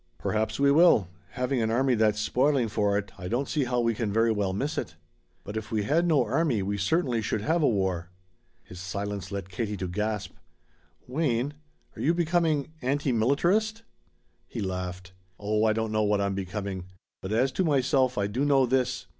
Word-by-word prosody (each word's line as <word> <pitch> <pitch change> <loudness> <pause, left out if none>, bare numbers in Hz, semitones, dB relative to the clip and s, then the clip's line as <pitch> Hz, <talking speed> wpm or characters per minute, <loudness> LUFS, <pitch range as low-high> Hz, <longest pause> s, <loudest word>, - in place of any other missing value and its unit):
"Perhaps 110 +1 -1
we 140 0 +5
will. 145 - +5 0.2
Having 125 0 -1
an 110 - +1
army 130 +3 +2
that's 110 -2 +2
spoiling 130 +3 +2
for 105 -2 +1
it, 100 -1 -4
I 90 - -5
don't 125 +7 -1
see 150 -4 0
how 125 0 0
we 115 0 +1
can 110 -2 -2
very 115 +2 +3
well 100 -3 0
miss 140 +11 -2
it." - - -4 0.5
"But 105 - -7
if 110 -1 -5
we 110 -2 0
had 165 +10 +2
no 155 -5 +3
army 145 - +1
we 100 +1 -2
certainly 125 - +1
should 110 0 -2
have 160 +8 +1
a 150 - +4
war." 95 -5 0 0.5
His 90 - -11
silence 100 0 -4
led 100 -2 -5
Katie 105 +1 -3
to 95 0 -3
gasp: 105 +1 -2 0.8
"Wayne, 135 -1 0 0.4
are - - -7
you 165 +4 +2
becoming 165 -4 +1
anti 140 +1 0
militarist?" 175 - +1 0.6
He - - -6
laughed. 90 -1 -4 0.3
"Oh, 105 +1 +1
I 110 - +3
don't 110 0 -2
know 110 0 +1
what 105 -1 +2
I'm 100 -1 0
becoming. 95 -1 -4 0.4
But 95 - -5
as 125 +5 +2
to 190 - 0
myself 135 -4 +2
I 100 - +1
do 110 +7 -1
know 140 -2 +4
this. 125 0 0
110 Hz, 190 wpm, -27 LUFS, 100-140 Hz, 0.8 s, we